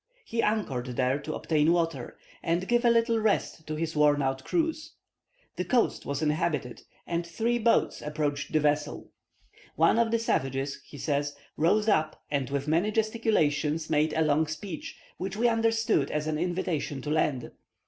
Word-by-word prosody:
He 230 0 -1
anchored 140 - -1
there 130 +2 0
to 155 +1 -5
obtain 155 0 +2
water, 165 -7 -1 0.2
and 170 +3 0
give 240 0 +2
a - - +7
little 230 0 +3
rest 210 -6 0
to 155 - -3
his 160 0 -3
worn 145 -1 +4
out 135 0 -1
crews. 320 -1 -1 0.6
This - - -2
coast 245 -2 +1
was 140 +2 -2
inhabited, 150 -5 -1 0.2
and 170 0 -1
three 230 +8 -1
boats 230 0 +2
approached 150 -1 -2
the 155 - +3
vessels. 150 0 -1 0.6
"One - - +4
of 230 -1 +3
the 230 - +2
savages," 135 - -1
he 145 - -11
says, 145 0 -1 0.2
"rose 210 +7 +2
up, 155 -7 +1
and 140 -3 -1
with 140 0 -2
many 170 +7 +2
gesticulations 165 -9 +1
made 155 0 +2
a 160 - +2
long 155 +1 +2
speech, 155 +2 -6 0.2
which 190 +2 -4
we 240 +2 +3
understood 225 - +2
as 150 0 -2
an 155 -1 -1
invitation 170 -6 -2
to 150 - -3
land. 145 -5 0
155 Hz, 170 wpm, -28 LUFS, 145-215 Hz, 0.6 s, a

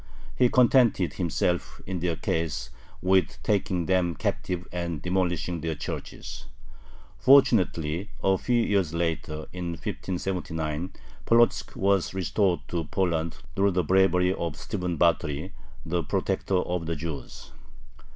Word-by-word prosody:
He 125 -1 +4
contented 120 -7 +4
himself 90 0 -1
in 95 -2 -3
their 85 -1 0
case 80 -6 -2 0.3
with 95 -2 +3
taking 95 -4 0
them 90 -2 +1
captive 90 +3 -2
and 85 -3 -3
demolishing 90 -1 -1
their 80 0 -2
churches. - - -7 0.7
Fortunately 100 - +4
a 95 0 +4
few 120 -2 +2
years 95 -7 +1
later, 80 -2 -2
in 90 -1 -3
1579, 85 -2 -3 0.3
Polotzk 120 0 +3
was 95 -1 +1
restored 95 -1 +1
to 85 -2 -2
Poland 85 0 -1 0.2
through 100 0 +3
the 90 0 +2
bravery 90 +1 +3
of 85 -4 -3
Stephen 90 -1 -3
Batory, 80 +1 +1 0.3
the 85 +2 0
protector 95 - -1
of 90 -2 -1
the 85 - -1
Jews. 75 -3 -7
90 Hz, 120 wpm, -27 LUFS, 80-95 Hz, 0.7 s, He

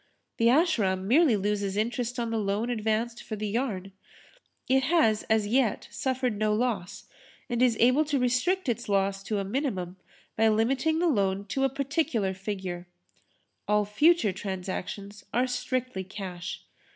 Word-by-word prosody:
The 230 - +3
Ashram 235 - +3
merely 270 -1 +5
loses 200 0 -1
interest 240 +3 -1
on 235 -1 -2
the 225 - 0
loan 210 +4 -1
advanced 225 +1 -1
for 215 - -5
the 215 0 -3
yarn. 205 -4 -2 0.8
It 265 +1 +4
has 260 -9 +3
as 220 -1 +3
yet 230 0 +1
suffered 255 -5 -1
no 215 0 +2
loss 215 -6 -2 0.4
and 240 0 -1
is 245 -3 +4
able 255 +6 +5
to 290 -1 0
restrict 265 +9 +1
its 235 -2 -2
loss 195 0 +1
to 210 +1 -2
a 200 - -1
minimum 195 - -3 0.4
by 225 - +3
limiting 260 +9 +2
the 350 +1 +2
loan 200 - +1
to 270 +5 +1
a - - +2
particular 275 - -1
figure. 190 -2 -5 0.8
All 210 0 +3
future 295 - +3
transactions 195 +2 -5
are 250 +2 +3
strictly 250 -4 -2
cash. 185 -2 -7
220 Hz, 150 wpm, -28 LUFS, 200-255 Hz, 0.8 s, merely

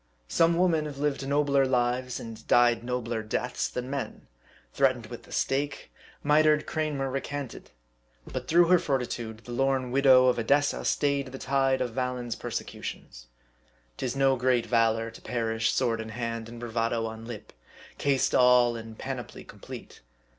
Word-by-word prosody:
Some 165 - +3
women 170 -4 +2
have 145 -2 -8
lived 140 -1 -1
nobler 140 -1 +3
lives, 125 -1 0
and 115 -1 -9
died 120 -1 +4
nobler 120 -2 -2
deaths, 125 +3 -2
than 125 0 -4
men. 140 0 -5 0.5
Threatened - - +2
with - - -10
the - - -17
stake, 140 +2 -2 0.3
mitred 150 +1 +4
Cranmer 150 -3 -2
recanted; 135 -1 -5 0.6
but - - -6
through 175 +2 +5
her 180 -1 +6
fortitude, 120 -6 -3
the 120 - -8
lorn 130 0 0
widow 130 -1 +6
of 125 -1 +3
Edessa 145 +5 +1
stayed 140 -2 +1
the 130 +1 -8
tide 135 0 +1
of 125 -2 -2
Valens' 125 -2 -2
persecu - - -5
tions. - - -8 0.7
'Tis 130 0 -3
no 135 -1 +3
great 125 -1 +2
valor 115 -1 +1
to 115 - -13
perish 115 -2 -1
sword 115 -3 0
in 110 - -7
hand, 115 0 -4
and 120 0 -9
bravado 115 -1 -1
on 110 0 -7
lip; 110 -3 -9 0.5
cased 140 -2 +1
all 125 -1 +5
in 115 -1 -8
panoply 125 -1 -6
complete. - - -11
125 Hz, 155 wpm, -28 LUFS, 115-140 Hz, 0.7 s, her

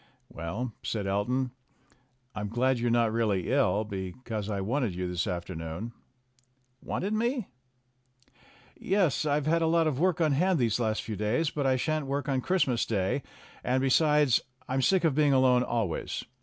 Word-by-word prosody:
"Well," 105 +9 -5
said 105 -3 -3
Elton, 120 +7 0 0.8
"I'm 105 -1 -4
glad 125 +3 +1
you're 120 0 0
not 115 -2 +2
really 105 -5 0
ill, 130 -6 +2
because 105 +2 -5
I 100 -2 -2
wanted 115 0 -1
you 90 0 -2
this 90 +3 -2
afternoon." 85 +3 -5 0.9
"Wanted 200 +4 -2
me?" 235 0 -1 1.3
"Yes, 180 - +1
I've 145 0 +1
had 165 +2 +2
a 165 - +2
lot 165 0 +3
of 145 -4 0
work 180 0 +2
on 160 -3 +3
hand 180 +6 +2
these 120 -4 +1
last 110 -2 0
few 110 - -4
days. 110 - 0
But 145 -2 -1
I 130 - +3
shan't 155 +2 -1
woik 140 +1 -2
on 135 -2 0
Christmas 135 -8 +1
Day, 100 +4 0 0.4
and, 130 +1 +1
besides, 145 0 +3 0.3
I'm 130 +1 0
sick 190 +6 +3
of 160 -4 +3
being 145 0 +3
alone 130 -1 +4
always. 115 -8 -2
125 Hz, 165 wpm, -28 LUFS, 105-150 Hz, 1.3 s, alone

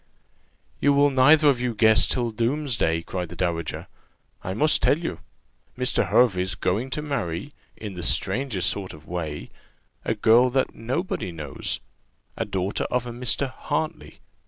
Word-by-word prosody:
"You 145 - +4
will 145 0 +4
neither 145 +4 +6
of 130 -4 +3
you 125 -2 -1
guess 110 0 +5
till 120 -2 0
doomsday!" 115 - 0
cried 90 -1 -4
the 90 - -9
dowager; 85 -2 -2 0.6
"I 95 - -4
must 155 +7 +3
tell 145 - +4
you. 160 - -5 0.6
Mr. 125 0 0
Hervey's 95 -6 +2
going 105 +9 -1
to 150 +3 -3
marry 135 - -3 0.2
in 105 -3 -7
the 90 - -6
strangest 100 +3 +1
sort 95 -2 -5
of 75 0 -14
way! 80 -4 -5 0.5
a 115 - -1
girl 115 +4 +5
that 130 +1 0
nobody 130 - -3
knows 75 -5 -4 0.5
a - - -2
daughter 95 -1 -2
of 125 0 -1
a 120 - -5
Mr. 125 +3 -1
Hartley. 155 +3 -4
115 Hz, 155 wpm, -24 LUFS, 90-135 Hz, 0.6 s, neither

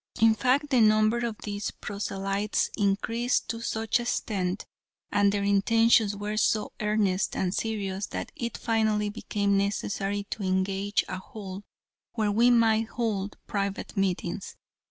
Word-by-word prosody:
In 225 0 +6
fact, 265 +6 +1
the 255 -3 +5
number 215 +1 +4
of 235 -3 -2
these 205 -1 -3
proselytes 200 0 -2
increased 225 +4 0
to 230 0 -3
such 225 0 0
an - - -2
extent, 195 -5 -2 0.5
and 205 -1 +4
their 200 0 -1
intentions 215 +1 +4
were 205 +1 -4
so 215 0 +1
earnest 210 -3 +1
and 185 -1 0
serious, 200 -3 -2
that - - -5
it 235 -1 -4
finally 220 -2 +1
became 205 -1 -1
necessary 200 0 -1
to - - -4
engage 195 +2 0
a 185 - -4
hall, 195 -1 -8 0.5
where 215 -3 +1
we 230 +4 +4
might 225 -2 +4
hold 210 -4 -2
private 200 -1 -3
meetings. 190 -1 -2
210 Hz, 140 wpm, -27 LUFS, 200-225 Hz, 0.5 s, In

